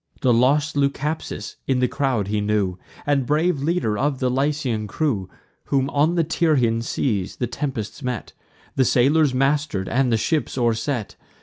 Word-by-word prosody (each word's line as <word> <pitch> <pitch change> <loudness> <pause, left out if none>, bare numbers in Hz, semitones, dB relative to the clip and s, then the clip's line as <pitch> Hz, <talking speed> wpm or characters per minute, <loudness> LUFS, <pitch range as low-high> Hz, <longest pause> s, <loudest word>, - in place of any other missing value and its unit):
The 125 -2 +4
lost 140 +6 +2
Leucaspis 145 +2 -2
in 135 - +2
the 125 0 +2
crowd 130 -8 -1
he 105 0 0
knew, 105 -3 0 0.3
And 145 -1 +2
the - - -5
brave 155 0 +1
leader 145 -9 0
of 140 0 0
the 130 -1 0
Lycian 130 -5 -1
crew, 105 - -1 0.4
Whom, 135 0 0
on 155 +4 +2
the 170 - +3
Tyrrhene 150 -8 +2
seas, 110 -5 -1
the 125 - -1
tempests 130 -1 -4
met; 125 -5 -4 0.4
The 135 - +4
sailors 135 +3 +3
master'd, 135 -7 +1
and 125 0 +1
the 115 - +3
ship 125 +5 0
o'erset. 115 -1 -1
130 Hz, 165 wpm, -22 LUFS, 115-145 Hz, 0.4 s, The